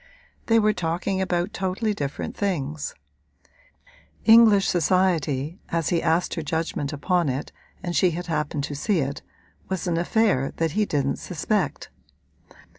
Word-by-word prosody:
They 230 Hz, -, +4 dB
were 215 Hz, -1 st, +4 dB
talking 180 Hz, +2 st, -1 dB
about 180 Hz, +1 st, -1 dB
totally 195 Hz, +3 st, -1 dB
different 145 Hz, -7 st, -4 dB
things: 155 Hz, -7 st, -2 dB, 1.3 s
English 220 Hz, -3 st, +7 dB
society, 170 Hz, -3 st, +1 dB
as 165 Hz, -2 st, 0 dB
he 170 Hz, -2 st, +1 dB
asked 165 Hz, +2 st, +1 dB
her 165 Hz, -, -3 dB
judgment 160 Hz, -2 st, -2 dB
upon 170 Hz, +2 st, 0 dB
it 135 Hz, +2 st, -3 dB, 0.3 s
and 175 Hz, -2 st, -3 dB
she 185 Hz, -, +4 dB
had 175 Hz, +2 st, -4 dB
happened 150 Hz, -3 st, -2 dB
to 145 Hz, -, -4 dB
see 185 Hz, +8 st, 0 dB
it, 140 Hz, -1 st, -2 dB, 0.5 s
was 190 Hz, 0 st, -2 dB
an 170 Hz, -2 st, 0 dB
affair 175 Hz, -, +1 dB
that 165 Hz, -1 st, 0 dB
he 210 Hz, +6 st, +1 dB
didn't 140 Hz, -2 st, 0 dB
suspect. 195 Hz, +5 st, -2 dB
175 Hz, 140 wpm, -24 LUFS, 150-190 Hz, 1.3 s, English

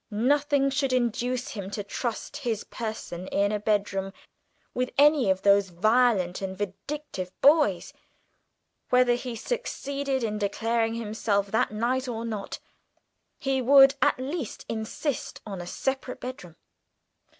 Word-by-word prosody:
Nothing 275 Hz, +5 st, +2 dB
should 275 Hz, -1 st, 0 dB
induce 245 Hz, +1 st, 0 dB
him 195 Hz, -3 st, -6 dB
to 205 Hz, 0 st, -4 dB
trust 235 Hz, +6 st, -4 dB
his 235 Hz, -7 st, -2 dB
person 215 Hz, -5 st, -6 dB
in 200 Hz, +1 st, +1 dB
a 210 Hz, -, -1 dB
bedroom 200 Hz, -2 st, -1 dB, 0.6 s
with 250 Hz, 0 st, -1 dB
any 290 Hz, -6 st, +5 dB
of 190 Hz, 0 st, +1 dB
those 200 Hz, -1 st, +4 dB
violent 205 Hz, -1 st, +2 dB
and 190 Hz, -1 st, -4 dB
vindictive 205 Hz, 0 st, -5 dB
boys; 280 Hz, -, +4 dB, 1.0 s
whether 250 Hz, -1 st, +4 dB
he 245 Hz, 0 st, -4 dB
succeeded 280 Hz, -, -3 dB
in 210 Hz, -2 st, -2 dB
declaring 225 Hz, +2 st, 0 dB
himself 210 Hz, -3 st, -1 dB
that 220 Hz, -, +2 dB
night 245 Hz, +5 st, -1 dB
or 230 Hz, -1 st, -4 dB
not, 215 Hz, -3 st, -4 dB, 0.8 s
he 270 Hz, -1 st, 0 dB
would 270 Hz, +2 st, +7 dB
at -, -, +3 dB
least 270 Hz, 0 st, -5 dB
insist 225 Hz, +5 st, -3 dB
on 195 Hz, -4 st, -6 dB
a 175 Hz, -, -8 dB
separate 265 Hz, +4 st, -3 dB
bedroom. 210 Hz, -10 st, -8 dB
230 Hz, 130 wpm, -27 LUFS, 205-265 Hz, 1.0 s, would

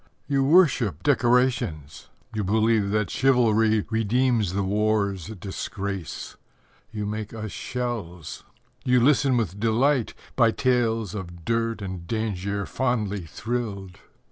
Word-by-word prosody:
You 140 Hz, -2 st, +1 dB
worship 135 Hz, -, +3 dB
decorations; 120 Hz, -, +1 dB, 0.2 s
you 110 Hz, -1 st, -1 dB
believe 110 Hz, +1 st, +2 dB
That 105 Hz, 0 st, 0 dB
chivalry 110 Hz, -5 st, +3 dB
redeems 115 Hz, -2 st, +1 dB
the 100 Hz, +1 st, 0 dB
war's 100 Hz, -2 st, 0 dB
disgrace. 95 Hz, -3 st, -5 dB, 0.5 s
You 105 Hz, -1 st, -4 dB
make 105 Hz, +1 st, -4 dB
us 110 Hz, -2 st, -5 dB
shells. 115 Hz, -, -5 dB, 0.4 s
You 125 Hz, 0 st, +4 dB
listen 135 Hz, 0 st, +4 dB
with 100 Hz, -4 st, -2 dB
delight, 120 Hz, +3 st, +2 dB, 0.2 s
By 115 Hz, -3 st, +5 dB
tales 115 Hz, -6 st, +1 dB
of 85 Hz, -4 st, -7 dB
dirt 115 Hz, -2 st, -1 dB
and 95 Hz, -3 st, -6 dB
danger 100 Hz, -2 st, -2 dB
fondly 105 Hz, -8 st, -1 dB
thrilled. 100 Hz, -3 st, -4 dB
110 Hz, 115 wpm, -25 LUFS, 100-120 Hz, 0.5 s, By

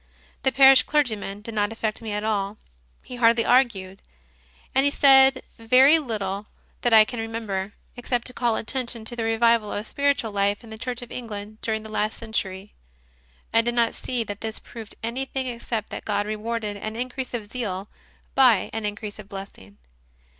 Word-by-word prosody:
The 265 Hz, -, +2 dB
parish 265 Hz, +1 st, +8 dB
clergyman 220 Hz, -9 st, -1 dB
did 230 Hz, +2 st, -8 dB
not 205 Hz, 0 st, +1 dB
affect 220 Hz, -1 st, -3 dB
me 220 Hz, -2 st, -5 dB
at 210 Hz, 0 st, -2 dB
all. 205 Hz, -1 st, -1 dB, 0.5 s
He 250 Hz, -, -8 dB
hardly 230 Hz, -1 st, +4 dB
argued, 205 Hz, -7 st, +2 dB, 0.7 s
and 265 Hz, -, +4 dB
he 285 Hz, -, +4 dB
said 270 Hz, -2 st, +6 dB, 0.2 s
very 260 Hz, +7 st, +6 dB
little 210 Hz, -6 st, -4 dB, 0.3 s
that 240 Hz, -, +1 dB
I 220 Hz, -1 st, +8 dB
can 240 Hz, -, -6 dB
remember, 215 Hz, -3 st, -4 dB, 0.2 s
except 245 Hz, -1 st, -2 dB
to 250 Hz, -, -4 dB
call 235 Hz, -2 st, +1 dB
attention 235 Hz, -2 st, -3 dB
to 240 Hz, -, -5 dB
the 235 Hz, -, -3 dB
revival 225 Hz, -1 st, +2 dB
of 205 Hz, -, -3 dB
spiritual 280 Hz, -5 st, 0 dB
life 200 Hz, +1 st, 0 dB
in 225 Hz, -, -13 dB
the 220 Hz, -, -7 dB
Church 245 Hz, 0 st, -4 dB
of 240 Hz, -, -12 dB
England 215 Hz, -3 st, -7 dB
during 220 Hz, -1 st, -2 dB
the -, -, -8 dB
last 215 Hz, 0 st, -1 dB
century. 195 Hz, -2 st, -4 dB, 0.8 s
I 230 Hz, -, +6 dB
did 240 Hz, +1 st, -2 dB
not 235 Hz, -1 st, +2 dB
see 250 Hz, -2 st, -2 dB
that 205 Hz, -2 st, -7 dB
this 220 Hz, -1 st, -4 dB
proved 225 Hz, -2 st, -11 dB
any 240 Hz, +4 st, -2 dB
thing 265 Hz, -1 st, -3 dB
except 235 Hz, -3 st, -4 dB
that -, -, -6 dB
God 205 Hz, -1 st, -1 dB
rewarded 215 Hz, 0 st, -3 dB
an 215 Hz, +2 st, -5 dB
increase 250 Hz, +1 st, -4 dB
of 215 Hz, -3 st, -6 dB
zeal 200 Hz, -6 st, -3 dB, 0.5 s
by 250 Hz, -7 st, +4 dB
an 220 Hz, -1 st, -2 dB
increase 210 Hz, 0 st, -6 dB
of 200 Hz, -1 st, -11 dB
blessing. 195 Hz, -, -10 dB
225 Hz, 180 wpm, -24 LUFS, 210-245 Hz, 0.8 s, parish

